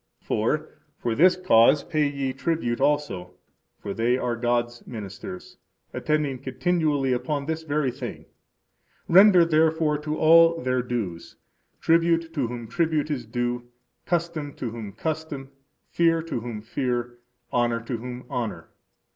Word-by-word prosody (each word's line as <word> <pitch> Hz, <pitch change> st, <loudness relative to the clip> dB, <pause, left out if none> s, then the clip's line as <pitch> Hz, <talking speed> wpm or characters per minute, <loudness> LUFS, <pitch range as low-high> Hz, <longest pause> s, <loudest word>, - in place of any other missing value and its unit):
For, -, -, -1 dB, 0.2 s
for 120 Hz, -, -2 dB
this 180 Hz, +9 st, +5 dB
cause 145 Hz, -6 st, +4 dB
pay 155 Hz, -3 st, +1 dB
ye 140 Hz, -2 st, -3 dB
tribute 135 Hz, -4 st, -1 dB
also; 140 Hz, -12 st, 0 dB, 0.4 s
for 100 Hz, -, -5 dB
they 120 Hz, +3 st, +1 dB
are 120 Hz, -2 st, -1 dB
God's 120 Hz, 0 st, -1 dB
ministers, 100 Hz, -5 st, -8 dB, 0.4 s
attending 150 Hz, -4 st, -1 dB
continually 145 Hz, -1 st, 0 dB
upon 140 Hz, +3 st, -2 dB
this 160 Hz, +1 st, -2 dB
very 150 Hz, -4 st, 0 dB
thing. -, -, -7 dB, 0.8 s
Render 185 Hz, -1 st, +7 dB
therefore 160 Hz, -1 st, +2 dB
to 150 Hz, +1 st, -3 dB
all 165 Hz, +1 st, +6 dB
their 130 Hz, -2 st, 0 dB
dues: 110 Hz, -9 st, -4 dB, 0.5 s
tribute 165 Hz, 0 st, +2 dB
to 140 Hz, -7 st, 0 dB
whom 120 Hz, -1 st, -6 dB
tribute 155 Hz, +1 st, 0 dB
is 125 Hz, -6 st, -3 dB
due; 120 Hz, +1 st, -2 dB, 0.4 s
custom, 170 Hz, -5 st, -2 dB
to 120 Hz, -, -5 dB
whom 110 Hz, -3 st, -7 dB
custom; 155 Hz, -4 st, -4 dB, 0.4 s
fear, 165 Hz, -1 st, +2 dB
to 160 Hz, -7 st, -3 dB
whom 115 Hz, -2 st, -6 dB
fear; 120 Hz, 0 st, -3 dB, 0.3 s
honor, 120 Hz, -1 st, +2 dB
to 115 Hz, +1 st, -4 dB
whom 125 Hz, +2 st, -7 dB
honor. 125 Hz, -5 st, -4 dB
135 Hz, 135 wpm, -25 LUFS, 120-160 Hz, 0.8 s, Render